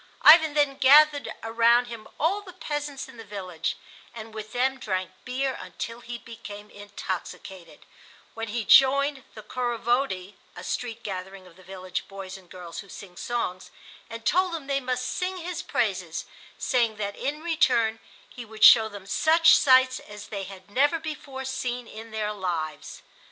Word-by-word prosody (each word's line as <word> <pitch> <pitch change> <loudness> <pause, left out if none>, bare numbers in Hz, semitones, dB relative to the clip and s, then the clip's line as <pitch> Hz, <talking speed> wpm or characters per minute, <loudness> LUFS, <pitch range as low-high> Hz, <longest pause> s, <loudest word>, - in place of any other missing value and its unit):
Ivan 315 -1 +8
then 290 -2 +2
gathered 290 +2 +6
around 235 +2 +4
him 230 -3 -9
all 365 +7 +1
the 375 -3 -12
peasants 295 -5 -4
in - - -14
the 225 - -9
village 185 -6 -4 0.4
and 220 -1 -9
with 215 -1 -7
them 260 +2 0
drank 185 -3 -3
beer 265 +1 -1
until 230 +1 -7
he 240 0 -7
became 215 -3 -10
intoxicated, 190 -2 -7 0.5
when 225 0 -5
he 225 0 -3
joined 275 +2 +5
the 215 - -9
Khorovody 240 -4 -1 0.2
(a 175 - -9
street 230 +2 -4
gathering 190 -1 -6
of 180 -2 -17
the 185 - -17
village 185 0 -6
boys 195 -1 -8
and 185 -2 -14
girls, 175 -3 -9
who 200 - -10
sing 185 -2 -11
songs), 185 -5 -3 0.4
and 230 0 -8
told 365 -1 +2
them 310 -4 -6
they 275 0 0
must 255 -1 -2
sing 365 +7 -2
his 355 0 -5
praises, - - -2 0.3
saying 235 -4 +1
that 200 -1 -4
in 300 +3 -4
return 245 -9 +2 0.3
he 245 - -9
would 220 -1 -6
show 220 -2 +9
them 205 -2 -10
such 320 +10 +5
sights 260 -2 +5
as 210 0 -11
they 200 -2 -4
had 190 0 -12
never 290 +8 +3
before 295 -4 -7
seen 250 -2 -3
in 225 +1 -10
their 215 -1 -2
lives. 170 -6 -4
230 Hz, 165 wpm, -26 LUFS, 200-275 Hz, 0.5 s, show